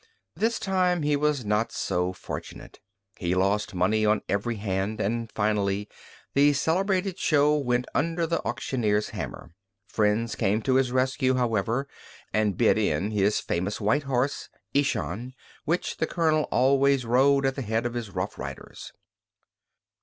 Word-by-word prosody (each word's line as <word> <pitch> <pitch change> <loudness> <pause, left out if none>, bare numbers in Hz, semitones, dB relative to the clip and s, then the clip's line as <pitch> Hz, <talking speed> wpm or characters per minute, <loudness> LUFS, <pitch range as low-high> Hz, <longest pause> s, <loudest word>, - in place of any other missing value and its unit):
This 225 +2 +1
time 180 -3 +1
he 145 0 +2
was 145 -4 0
not 105 +2 0
so 90 +1 -1
fortunate. 95 - -8 0.4
He 90 -1 0
lost 100 +2 0
money 100 +5 +2
on 105 0 +2
every 105 +4 -1
hand, 100 0 -2
and 115 +2 -2
finally 105 -1 0 0.5
the 145 +1 +5
celebrated 185 +5 0
show 150 -1 +3
went 125 -4 0
under 165 +3 0
the 165 +1 -1
auctioneer's 105 -5 -1
hammer. - - -7 0.3
Friends 110 +2 0
came 105 +3 0
to 130 - +1
his 130 -2 +1
rescue, 130 +1 +1
however, 120 +2 0 0.5
and 105 -3 +1
bid - - +4
in 90 +8 0
his 105 0 +2
famous 95 +4 -2
white 115 +8 +2
horse, 130 +2 -1 0.2
Ishan, 125 - -1 0.3
which 170 +4 -1
the - - 0
Colonel 155 -3 +1
always 135 0 +3
rode 135 +3 +3
at 135 - +2
the 135 - -5
head 115 0 -1
of 120 - -2
his 120 -3 -4
roughriders. - - -6
120 Hz, 145 wpm, -26 LUFS, 105-145 Hz, 0.5 s, the